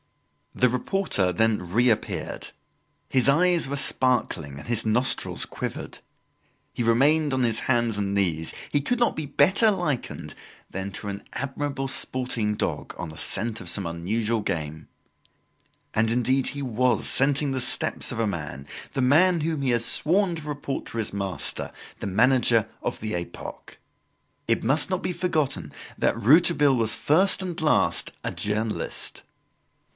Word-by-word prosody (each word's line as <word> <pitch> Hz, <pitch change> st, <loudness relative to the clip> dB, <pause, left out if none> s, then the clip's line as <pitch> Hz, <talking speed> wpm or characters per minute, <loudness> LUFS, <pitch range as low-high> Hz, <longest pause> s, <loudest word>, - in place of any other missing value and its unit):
The 125 Hz, -, +3 dB
reporter 125 Hz, -, 0 dB
then 105 Hz, -1 st, 0 dB
reappeared. 120 Hz, +1 st, -1 dB, 0.6 s
His 130 Hz, 0 st, +2 dB
eyes 170 Hz, 0 st, +3 dB
were 140 Hz, -, -2 dB
sparkling 125 Hz, -, 0 dB
and -, -, -11 dB
his 115 Hz, -2 st, +2 dB
nostrils 120 Hz, +5 st, -1 dB
quivered. -, -, -6 dB, 0.7 s
He -, -, -4 dB
remained 140 Hz, +6 st, +3 dB
on 130 Hz, -1 st, +1 dB
his 115 Hz, -2 st, +1 dB
hands 120 Hz, -4 st, 0 dB
and 100 Hz, -1 st, -2 dB
knees. 85 Hz, -5 st, 0 dB, 0.2 s
He 145 Hz, -, +1 dB
could 245 Hz, -, -1 dB
not 240 Hz, -, +2 dB
be 155 Hz, -2 st, -4 dB
better 190 Hz, -, +4 dB
likened 175 Hz, -10 st, -3 dB, 0.4 s
than 95 Hz, +1 st, -5 dB
to 105 Hz, -, -6 dB
an 100 Hz, 0 st, -6 dB
admirable 140 Hz, 0 st, -3 dB
sporting 125 Hz, -5 st, -1 dB
dog -, -, -4 dB
on 90 Hz, -, -6 dB
the 80 Hz, -, -11 dB
scent 115 Hz, +3 st, +1 dB
of 85 Hz, -, -5 dB
some 95 Hz, +2 st, -2 dB
unusual 105 Hz, +7 st, -2 dB
game. 80 Hz, -5 st, -4 dB, 1.1 s
And, 110 Hz, +1 st, +1 dB
indeed, 125 Hz, +3 st, +1 dB
he 140 Hz, 0 st, -4 dB
was 125 Hz, -1 st, 0 dB
scenting 140 Hz, +1 st, +3 dB
the 130 Hz, -1 st, -2 dB
steps -, -, +2 dB
of -, -, -5 dB
a 115 Hz, -, +1 dB
man, 75 Hz, -7 st, -6 dB, 0.3 s
the 135 Hz, -, -1 dB
man 160 Hz, +7 st, +4 dB
whom 155 Hz, -1 st, -2 dB
he 135 Hz, -, 0 dB
has 120 Hz, -1 st, +2 dB
sworn 180 Hz, +2 st, +6 dB
to 155 Hz, -2 st, -8 dB
report 145 Hz, -2 st, -5 dB
to -, -, -8 dB
his 110 Hz, -3 st, -2 dB
master, 100 Hz, -2 st, -2 dB, 0.3 s
the -, -, -4 dB
manager 115 Hz, +1 st, +3 dB
of -, -, -4 dB
the 110 Hz, 0 st, -4 dB
"Epoque." 85 Hz, 0 st, -7 dB, 0.7 s
It -, -, 0 dB
must 150 Hz, +5 st, +2 dB
not 185 Hz, -1 st, -2 dB
be 180 Hz, -, -2 dB
forgotten 160 Hz, -6 st, -1 dB, 0.3 s
that -, -, 0 dB
Rouletabille 145 Hz, -, +4 dB
was 115 Hz, -2 st, +1 dB
first 190 Hz, +6 st, +2 dB
and 180 Hz, -2 st, -5 dB
last 85 Hz, -, +2 dB
a -, -, -3 dB
journalist. 105 Hz, +1 st, -3 dB
125 Hz, 155 wpm, -25 LUFS, 105-145 Hz, 1.1 s, sworn